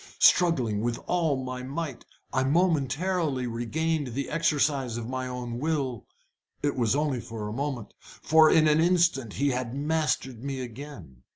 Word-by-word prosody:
Struggling 130 -12 +4
with 120 +1 -1
all 165 -6 +1
my 130 0 -5
might, 135 -1 -5 0.3
I 130 - +2
momentarily 155 -1 +1
regained 130 +3 -2
the 140 0 -3
exercise 145 -6 +1
of 115 -1 -5
my 130 0 -3
own 125 -1 -5
will. 140 -5 -2 0.6
It 145 -1 +1
was 120 -1 +1
only 145 -3 0
for 110 -2 -6
a 105 - -5
moment, 135 -3 -4
for 160 0 +3
in 155 -1 +5
an 150 +1 +4
instant 170 - +2
he 140 +1 +1
had 125 -1 -2
mastered 145 -5 -1
me 135 -1 -3
again. 120 - -9
135 Hz, 155 wpm, -27 LUFS, 125-155 Hz, 0.6 s, in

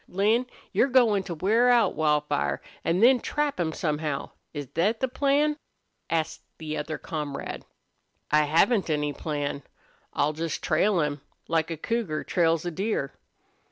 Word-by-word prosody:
"Lin, 215 +7 +2 0.2
you're 260 - +3
goin' 240 -6 +4
to 175 - -4
wear 220 +9 +3
out 240 -1 +4
Wildfire, 150 - +1 0.2
an' 175 +4 +1
then 250 +2 +6
trap 295 -1 -1
him 165 -2 0
somehow 150 -2 -2 0.2
is 145 -2 -5
thet 205 +7 +1
the 260 - +1
plan?" 285 +3 +1 0.5
asked 160 -1 -1 0.2
the 155 -1 -5
other 155 +1 -3
comrade. 150 -3 -5 0.7
"I 150 0 +5
haven't 170 +7 +3
any 150 -1 0
plan. 145 -2 -3 0.5
I'll 145 +1 +1
just 165 +1 -4
trail 180 +3 +2
him, 150 -1 -2 0.3
like 165 0 +1
a 165 - -4
cougar 195 -4 -2
trails 165 -1 +1
a 175 - -2
deer." 190 -5 -2
165 Hz, 150 wpm, -26 LUFS, 150-225 Hz, 0.7 s, then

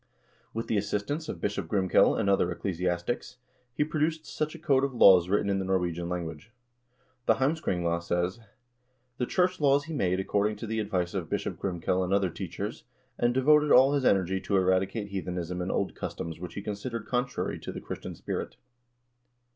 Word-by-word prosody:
With 115 +1 -3
the 110 - 0
assistance 105 +10 -2
of - - -5
Bishop 100 -4 -2
Grimkel 95 -1 +3
and - - 0
other 100 -3 +3
eccle 90 +1 -3
siastics, 90 +8 -2 0.4
he 135 - +1
produced 155 +1 -1
such 155 +1 -3
a - - -7
code 140 -5 +2
of 140 -2 -1
laws 90 -6 +7
written 100 +1 +2
in 100 -1 +1
the - - -1
Norwegian 90 -2 -1
language. 85 0 -5 0.8
The - - +5
"Heimskringla" 90 - 0
says: 90 +4 -1 0.8
"The 125 - 0
church 185 0 +1
laws 140 0 +4
he 160 +2 -7
made 95 - +1
according 105 +2 0
to 105 - -7
the 110 0 -2
advice 90 -4 -1
of 90 -5 -3
Bishop - - -3
Grimkel 90 0 0
and 90 +1 -1
other 95 -3 +1
teachers, - - -5 0.4
and 120 - +3
devoted 150 +4 +4
all 135 +3 +7
his 140 -2 +1
energy 95 -4 +2
to 100 - +1
eradicate 95 +3 +1
heathenism 90 -2 -3
and 90 - -2
old 100 - -1
customs 80 -1 -5
which 90 -1 -7
he 100 - -5
considered 105 +2 -4
contrary 125 0 -2
to - - -6
the - - -6
Christian - - -7
spirit." - - -4
100 Hz, 180 wpm, -28 LUFS, 90-130 Hz, 0.8 s, laws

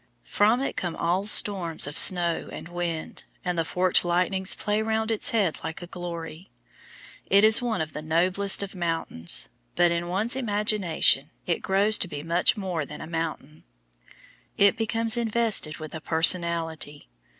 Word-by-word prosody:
From 220 +5 +1
it 275 - -4
come 175 -3 -4
all 180 +4 -2
storms 190 -6 +4
of 145 +1 -5
snow 175 -2 +6
and - - -9
wind, 175 -2 -6 0.2
and 180 0 -2
the 165 - -1
forked 180 +3 +1
lightnings 180 +2 0
play 210 +1 -2
round 220 0 -2
its 220 - +1
head 200 -8 -1
like 160 +2 -7
a - - -7
glory. 175 0 -9 0.8
It 200 +1 +3
is 220 +2 +6
one 235 -7 -2
of 155 -1 -6
the 150 - -7
noblest 185 +6 +1
of 195 - -8
mountains, 165 - -1 0.3
but 175 -1 +2
in 170 0 -3
one's 210 +7 -1
imagination 205 - 0 0.2
it 170 - -2
grows 200 +3 +1
to - - -3
be 145 -4 -8
much 170 +7 0
more 185 -6 -4
than 150 +2 -10
a - - -8
mountain. 160 -2 -6 0.9
It 200 +1 +4
becomes 225 0 0
invested 225 -8 0
with 155 -1 -10
a 160 - -7
personality. 165 -2 +1
175 Hz, 160 wpm, -24 LUFS, 165-205 Hz, 0.9 s, snow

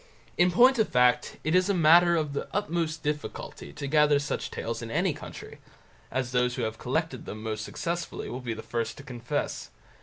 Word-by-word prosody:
In 175 +1 +4
point 245 +6 +5
of 220 - +2
fact, 125 -1 +3
it 155 - 0
is 185 +2 +3
a 200 - +2
matter 170 +1 +6
of 155 -3 -1
the 140 - -3
utmost 165 -5 -1
difficulty 150 0 -4
to 145 -1 -6
gather 150 0 +4
such 145 +1 -3
tales - - -4
in - - -6
any - - +1
country, - - -10 0.5
as 130 -2 -2
those 125 0 +1
who 125 - -2
have 110 0 -3
collected 135 0 -2
them 110 +1 -7
most 110 -1 -3
successfully 170 +7 -4
will 125 - -5
be 120 -2 -3
the 110 - -8
first 115 -2 -3
to 145 - -10
confess. 120 -3 -4
145 Hz, 200 wpm, -28 LUFS, 125-170 Hz, 0.5 s, matter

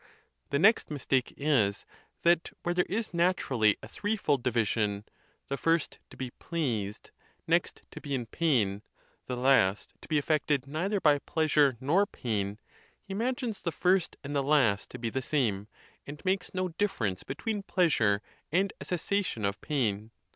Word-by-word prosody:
The 140 - +1
next 210 +9 +4
mistake 135 -3 0
is, 125 -9 +1 0.4
that 170 0 +3
where 175 - 0
there 180 0 +1
is 220 +3 -1
natu 175 -2 +1
rally 110 -5 +4
a - - -7
threefold 205 - 0
division—the 110 +2 -2
first, 165 0 0
to - - -14
be 130 -2 -5
pleased; 115 - -3 0.3
next, - - 0
to - - -9
be 140 -1 -2
in 125 -2 -3
pain; 115 -9 +1 0.5
the 125 - -3
last, 120 -7 +3
to - - -12
be 155 - +1
affected 145 -2 +1
neither 180 +9 -1
by 150 -4 +4
pleasure 150 -4 +2
nor 170 +10 +2
pain—he 110 - -6
imagines 235 0 -2
the 170 - -1
first 180 +1 +1
and 145 +1 -5
the 140 - +3
last 135 -8 +2
to - - -8
be 115 -2 -3
the 130 - -1
same, 115 -8 0 0.4
and 145 +5 -9
makes 185 -1 0
no 185 0 -1
difference 125 - -1
between 205 +10 -3
pleasure 130 - +2 0.3
and 190 +4 +1
a - - -6
cessation 180 - -1
of 100 0 -2
pain. 110 -8 -1
145 Hz, 155 wpm, -29 LUFS, 115-175 Hz, 0.5 s, next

